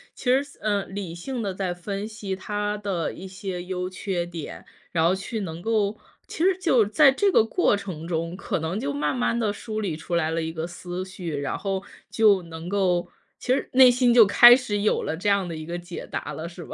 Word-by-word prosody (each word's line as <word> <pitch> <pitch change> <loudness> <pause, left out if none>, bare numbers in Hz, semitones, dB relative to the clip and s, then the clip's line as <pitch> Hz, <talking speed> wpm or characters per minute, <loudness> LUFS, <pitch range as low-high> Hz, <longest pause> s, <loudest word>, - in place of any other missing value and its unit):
其 - - -12
实， 260 +3 +4 0.2
呃， 205 -2 0
理 190 -3 -6
性 245 +8 -5
地 200 -3 -2
再 185 -1 -2
分 200 +4 -5
析 210 -3 -5
它 205 +2 -3
的 195 -5 -2
一 190 - -9
些 185 -1 -6
优 180 0 -3
缺 185 -2 -3
点， 170 -3 -8 0.3
然 165 -1 +2
后 180 - +3
去 200 +4 -5
能 165 -3 -6
够 215 -1 0 0.3
其 325 - -3
实 380 0 +3
就 255 - +4
在 265 +7 +5
这 395 +8 +2
个 220 - +5
过 225 - +2
程 170 -5 -7
中， 165 +1 -2
可 195 - -3
能 160 +4 -3
就 140 0 -2
慢 150 - -1
慢 240 -1 0
地 215 -3 0
梳 215 0 -5
理 185 -7 -2
出 170 +2 -4
来 160 -2 +1
了 165 - -1
一 160 0 -3
个 160 +1 -4
思 180 +1 -6
绪， 180 -5 -6
然 140 - -2
后 195 -1 -3 0.3
就 210 -4 +4
能 165 0 -9
够 180 -3 +1 0.3
其 250 - +1
实 270 - -2
内 260 -1 +8
心 245 -1 +3
就 235 -2 +8
开 240 +4 +9
始 215 -6 -2
有 210 - +2
了 - - -2
这 185 +5 -1
样 200 -2 +2
的 165 - -5
一 155 - -7
个 170 +2 -4
解 175 0 -8
答 - - -4
了， 165 +2 -6
是 170 -1 -10
吧？ - - -9
190 Hz, 245 characters per minute, -25 LUFS, 170-215 Hz, 0.3 s, 开